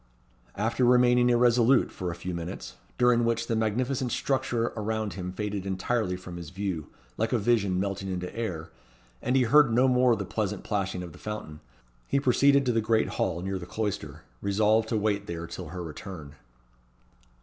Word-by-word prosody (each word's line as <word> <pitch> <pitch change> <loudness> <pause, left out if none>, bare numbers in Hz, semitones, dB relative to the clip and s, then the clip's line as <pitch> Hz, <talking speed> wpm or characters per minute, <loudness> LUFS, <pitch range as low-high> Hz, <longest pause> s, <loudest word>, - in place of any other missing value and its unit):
After 115 +4 0
remaining 125 0 +5
irresolute 120 +1 +4
for 90 -2 -4
a 85 - -4
few 90 +1 -5
minutes, 85 -7 -6 0.2
during 125 -1 +4
which 115 0 0
the 115 - -1
magnificent 125 +4 0
structure 130 -4 0
around 110 -1 -2
him 90 -1 -5
faded 100 0 -3
entirely 95 +1 -1
from 90 -1 -9
his 85 -3 -7
view 90 -4 -4 0.3
like 110 +1 0
a 125 - +3
vision 100 -4 +1
melting 95 0 -2
into 90 -1 -4
air, 90 -9 -4 0.5
and 125 +2 0
he 130 - +5
heard 140 +1 +5
no 125 +3 +4
more 125 -1 +4
the 100 -2 -4
pleasant 105 -1 -3
plashing 95 -3 -2
of 85 - -8
the - - -14
fountain, 105 -8 -6 0.5
he 140 - +2
proceeded 140 +1 +4
to 125 - +2
the 115 -1 +1
great 110 0 +2
hall 85 -2 -1
near 95 0 -2
the 90 - -8
cloister, 105 -1 -4 0.2
resolved 110 +2 +2
to 115 - +1
wait 105 -1 0
there 85 -1 -4
till 85 - -7
her 90 +3 -6
return. 80 -2 -8
105 Hz, 180 wpm, -27 LUFS, 95-120 Hz, 0.5 s, remaining